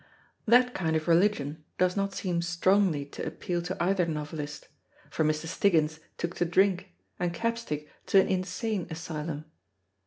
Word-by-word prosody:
That 245 +2 +5
kind 160 -3 0
of 155 +1 -1
religion 165 -4 +2
does 180 0 +2
not 200 0 0
seem 175 -3 -1
strongly 175 -2 +2
to 140 - -7
appeal 170 +2 -3
to 175 +2 -4
either 180 0 +2
novelist; 150 -1 -5 0.4
for - - +1
Mr. 155 +1 0
Stiggins 160 -3 +2 0.2
took 170 +1 -2
to 175 - +2
drink, 180 - +2 0.2
and 175 -1 0
Capstick 230 -10 -2 0.2
to 195 - +6
an - - +4
insane 185 +2 -1
asylum. 160 -2 -5
175 Hz, 150 wpm, -29 LUFS, 155-190 Hz, 0.4 s, to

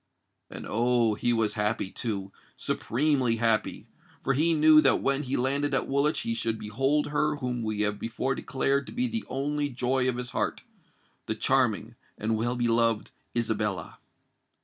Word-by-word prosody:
And, - - -8
oh! 120 0 +2
he 120 +3 0
was 115 -2 +1
happy, 105 -2 -1
too—supremely 115 +5 -1
happy; 115 -1 0 0.4
for 135 - +1
he 160 +5 +2
knew 155 0 +7
that - - +4
when 140 +1 +1
he 135 -1 -2
landed 140 +3 0
at - - 0
Woolwich 140 +3 +1
he 115 - -2
should 115 0 -2
behold 135 +9 0
her 150 0 +1
whom 125 -4 -3
we 110 -2 -2
have 105 0 0
before 115 +4 -2
declared 135 +1 -1
to - - -8
be 250 +2 0
the 230 -1 -3
only 145 +2 -1
joy 130 0 0
of 125 - -2
his 125 0 -4
heart—the 110 - -6
charming 120 -2 +1 0.2
and 110 +1 -1
well 120 +3 -1
beloved 115 -2 +1 0.3
Isabella! 105 -6 -2
125 Hz, 155 wpm, -27 LUFS, 110-140 Hz, 0.4 s, knew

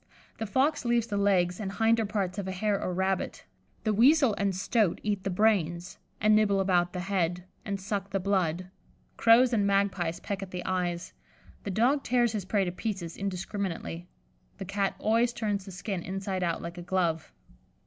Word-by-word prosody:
The 225 - -3
fox 280 +8 +1
leaves 235 -1 +2
the 215 -3 -4
legs 185 -3 +2
and 195 -2 -4
hinder 225 0 +2
parts 200 -2 -2
of 195 - -4
a - - -2
hare 200 +2 0
or - - -2
rabbit; 190 +1 -2 0.4
the 215 - +1
weasel 265 +3 +5
and 200 -2 -1
stoat 200 0 +1
eat 205 -2 -1
the 195 - -1
brains, 180 -4 +1 0.2
and 215 0 +4
nibble 205 -2 +3
about 180 -2 +2
the 180 - -3
head, 180 -2 -1 0.2
and 200 -1 -3
suck 195 0 -3
the 195 0 -1
blood; 185 -2 0 0.4
crows 240 +2 +5
and 205 -3 +2
magpies 195 -4 +1
peck 200 -1 -4
at 195 - -6
the 180 -1 -6
eyes; 180 -2 -2 0.5
the - - -2
dog 245 +9 +2
tears 240 -2 +2
his 210 -4 -3
prey 195 0 +1
to 175 - -2
pieces 185 -3 -4
indiscriminately; 185 -3 -4 0.5
the 195 - -6
Cat 200 +1 -1
always 230 +2 +2
turns 205 -4 -2
the 195 - -9
skin 190 0 -4
inside 190 +1 -3
out 170 -2 -1
like 170 +1 -6
a - - -6
glove. 170 -3 -1
195 Hz, 185 wpm, -28 LUFS, 180-215 Hz, 0.5 s, weasel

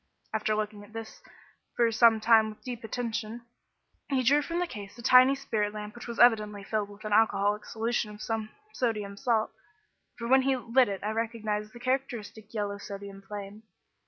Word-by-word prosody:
After 215 0 0
looking 210 -1 -3
at 205 +1 -16
this 225 -1 -8 0.5
for 235 -1 +3
some 225 -1 +5
time 220 0 +5
with 215 - -12
deep 245 -3 -6
attention, 230 0 -4 0.6
he 265 -2 +1
drew 285 +5 +5
from 335 +3 -3
the 355 - +1
case 205 - -9
a 235 - -10
tiny 255 +3 +7
spirit 210 -6 -2
lamp 210 0 -6
which 240 - -10
was 235 -1 -6
evidently 210 -4 +4
filled 210 0 -2
with 205 +2 -13
an 210 - -1
alcoholic 210 -1 +3
solution 225 0 -1
of 210 0 -11
some 220 0 -3 0.2
sodium 210 -5 -2
salt, 220 +1 +1 0.7
for 235 - -4
when 265 +2 +6
he 265 0 +1
lit 245 0 +3
it 195 -1 -5
I 210 - -1
recognised 220 -2 -2
the 240 - -12
characteristic 240 -5 -3
yellow 205 -2 -3
sodium 200 -1 -8
flame. 205 +1 -8
220 Hz, 185 wpm, -29 LUFS, 210-240 Hz, 0.7 s, tiny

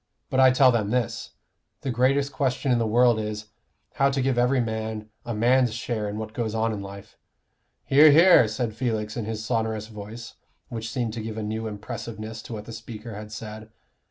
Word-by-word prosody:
But 130 - +1
I 130 0 +8
tell 130 0 +5
them 110 -4 0
this: 120 0 -2 0.5
the 135 - -2
greatest 135 +4 +2
question 130 -1 0
in 120 - +3
the 115 - +1
world 120 0 +4
is, 105 0 -5 0.4
how 140 0 +3
to 135 0 -1
give 130 0 +1
every 125 +2 +3
man 110 -2 -3 0.2
a 120 - -2
man's 120 +1 +3
share 115 -3 -3
in 105 - -5
what 110 0 -6
goes 115 -2 -2
on 110 0 +1
in 100 - -5
life 100 0 -10 0.3
" - - -48
"Hear, 150 +3 +8
hear!" 165 -5 +7
said 110 +1 -2
Felix 110 -3 -2
in 115 - -3
his 110 0 -4
sonorous 110 -2 -1
voice, 110 +2 -9 0.3
which 115 0 -5
seemed 120 -3 -2
to 115 - -4
give 110 0 -6
a 110 - -3
new 110 +1 -3
impressiveness 110 +1 -6
to - - -9
what 105 -1 -6
the 115 - -8
speaker 110 0 -8
had 105 +1 -8
said. 110 0 -8
115 Hz, 205 wpm, -25 LUFS, 110-125 Hz, 0.5 s, I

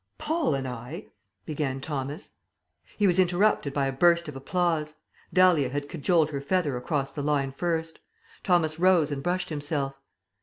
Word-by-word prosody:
"Paul 310 - 0
and 135 -1 -3
I 125 -1 -7 0.2
" - - -50
began 145 -3 -2
Thomas. 140 0 -5 0.7
He 210 - +2
was 185 -1 +4
interrupted 180 -3 +2
by 140 0 0
a 135 - 0
burst 170 +4 +3
of 150 - -7
applause. 155 +1 -1 0.4
Dahlia 175 -6 +4
had 145 +2 -3
cajoled 160 +1 +1
her 140 -2 -3
feather 150 -2 0
over 135 +3 -1
the 145 - -4
line 140 -2 0
first. 165 +2 -2 0.4
Thomas 165 -4 +1
rose 175 -5 +4
and 140 -1 -3
brushed 180 +4 -1
himself. 145 -3 -3
150 Hz, 160 wpm, -27 LUFS, 140-175 Hz, 0.7 s, was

